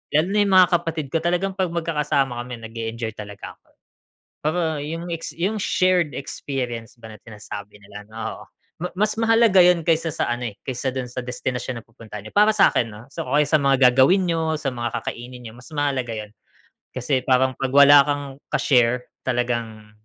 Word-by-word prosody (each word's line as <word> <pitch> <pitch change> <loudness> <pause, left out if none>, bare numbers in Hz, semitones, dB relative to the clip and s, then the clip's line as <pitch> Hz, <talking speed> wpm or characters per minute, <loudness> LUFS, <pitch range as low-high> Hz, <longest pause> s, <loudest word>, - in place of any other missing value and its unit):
lalo 155 +3 +4
na 210 - +2
yung 195 - +1
mga 185 -1 +8
kapatid 165 -4 -4
ko, - - +2
talagang 180 +3 0
'pag 190 -3 -1
magkakasama 150 -7 -1
kami 125 -1 -8
nag-e-enjoy 115 0 -5
talaga 100 -1 -9
ako. - - -42 0.8
Pero 155 +4 +1 0.2
yung 165 +3 -5
ex 165 -1 -5
yung 190 +6 -1
shared 180 -5 +2
experience 125 -4 -5
ba 110 -1 -10
na 110 - -12
sinasabi 105 -2 -9
nila, 105 0 -12
oo, 110 +1 -6 0.4
ma 180 - -2
mas 210 +2 +2
mahalaga 225 -3 +4
yun 175 -1 +5
kaysa 165 0 +1
sa - - 0
ano 120 0 -2
eh, 105 - -11
kaysa 130 0 -3
dun 130 -1 -2
sa 125 - -4
destinasyon 125 -1 -4
na - - -35
pupuntahan 110 -3 -11
niyo, 110 - -11
para 210 +1 +4
sa'kin, 125 - +4
ah, 110 - -12
so 165 - -5
o - - -2
kaya 150 - +5
sa 155 +1 +2
mga 135 -2 +5
gagawin 155 +10 +4
niyo, 165 -2 0
sa 140 -3 -3
mga 120 -2 -4
kakainin 125 +1 -7
niyo, 110 - -8
mas 120 - -13
mahalaga 135 -6 -1
yun. 105 -1 -7 0.6
Kasi 130 0 -1
parang 130 0 +2
'pag 135 -1 -2
wala 140 0 +9
kang 145 -1 -1 0.2
ka-share 125 -2 +1 0.2
talagang, 120 -4 -2
130 Hz, 190 wpm, -22 LUFS, 120-165 Hz, 0.8 s, wala